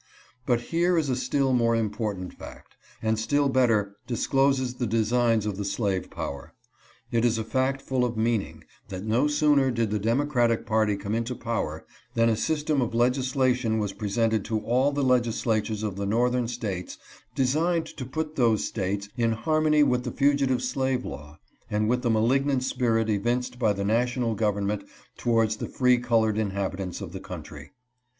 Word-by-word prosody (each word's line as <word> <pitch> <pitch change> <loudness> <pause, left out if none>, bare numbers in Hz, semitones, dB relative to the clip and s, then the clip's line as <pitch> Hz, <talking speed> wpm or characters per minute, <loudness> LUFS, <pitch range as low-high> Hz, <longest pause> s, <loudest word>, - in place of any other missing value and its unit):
But 120 -2 +2
here 170 +6 +1
is 155 -4 +1
a - - +1
still 130 +1 0
more 115 -2 +3
important 105 -4 -2
fact, - - -12 0.3
and 110 0 +1
still 145 +5 +1
better 110 -6 +2
discloses 130 +1 +1
the 125 -1 -3
designs 115 0 +2
of 105 -2 -3
the 100 - -3
slave 100 -2 -1
power. 70 -1 -6 0.6
It 115 -1 +1
is 120 -1 +2
a 110 - -2
fact 130 +4 -1
full 130 -2 0
of 120 -2 -1
meaning, 110 -2 -1 0.3
that 95 0 -6
no 115 +7 +2
sooner 145 -2 +3
did 115 -4 -1
the 105 - 0
democratic 120 +1 +1
party 110 -2 +2
come 100 +1 -4
into 115 +2 -2
power 95 -11 -3 0.3
than 115 0 +4
a 115 - +2
system 150 +2 0
of 115 -2 -2
legislation 125 -1 +1
was 105 -2 -2
presented 110 0 0
to 110 -2 -1
all 125 +6 +2
the 145 0 -1
legislatures 115 -4 +1
of 100 -3 -3
the 100 0 -2
Northern 120 +3 +1
States 105 -7 -4 0.4
designed 160 +6 +1
to 150 - -8
put 155 +4 -4
those 115 -4 +3
States 100 0 -3
in 115 -1 +2
harmony 155 +4 +2
with 125 -3 +1
the - - -4
fugitive 140 -2 +2
slave 130 0 -1
law, 75 +2 -8 0.3
and 105 0 0
with 125 +2 +1
the 120 - 0
malignant 130 +4 +2
spirit 115 -4 +1
evinced 120 +4 -1
by 110 -4 +3
the 100 -1 -2
national 120 +2 +1
government 105 -1 -1 0.3
towards 115 -2 +1
the - - -5
free 125 -1 +3
colored 110 -3 +1
inhabitants 95 -2 -3
of 95 -4 -6
the 95 - -6
country. 75 -5 -9
115 Hz, 170 wpm, -26 LUFS, 105-130 Hz, 0.6 s, than